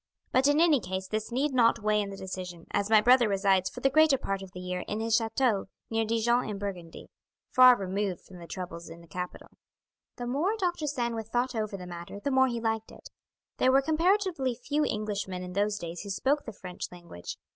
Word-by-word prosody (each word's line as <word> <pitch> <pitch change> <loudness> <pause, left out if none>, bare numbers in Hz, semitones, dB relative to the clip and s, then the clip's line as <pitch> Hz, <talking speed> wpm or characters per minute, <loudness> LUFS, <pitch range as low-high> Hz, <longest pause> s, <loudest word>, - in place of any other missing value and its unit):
But 260 +2 +4
in 290 +1 +4
any 325 -4 +5
case 190 -2 -4
this 215 +3 -3
need 270 +4 0
not 230 -3 +3
weigh 210 0 +2
in 200 - -4
the 195 - -8
decision, 180 -3 -7
as 200 +1 0
my 220 -1 +6
brother 245 0 +5
resides 195 -2 +2
for 245 - -9
the 270 - +4
greater 310 -1 +5
part 195 -6 -3
of 190 -1 -10
the 180 - -9
year 180 0 -3
in 210 - -3
his 225 0 +1
chateau 225 -2 +1 0.3
near 225 0 +1
Dijon 230 +2 +1
in 205 - -4
Burgundy, 185 -5 -7 0.4
far 255 -1 +8
removed 195 -2 -2
from 180 -2 -14
the 170 - -10
troubles 170 -2 -7
in 165 +1 -11
the 170 - -16
capital." 180 +2 -6 0.7
The 245 - -5
more 310 - 0
Dr. 350 -6 -1
Sandwith 235 -5 -2
thought 245 +3 0
over 215 -3 -3
the 180 - -8
matter 175 +2 -8
the 280 - -2
more 260 0 +5
he 235 -2 -2
liked 225 -1 -2
it. - - -13 0.5
There 255 - +4
were 270 +1 +4
comparatively 330 - +1
few 290 +5 -1
Englishmen 200 -3 -3
in 180 0 -7
those 205 +2 +1
days 170 -2 -6
who 205 - -8
spoke 275 +9 0
the 225 - -5
French 180 -3 -7
language. 170 - -9
215 Hz, 215 wpm, -29 LUFS, 190-255 Hz, 0.7 s, far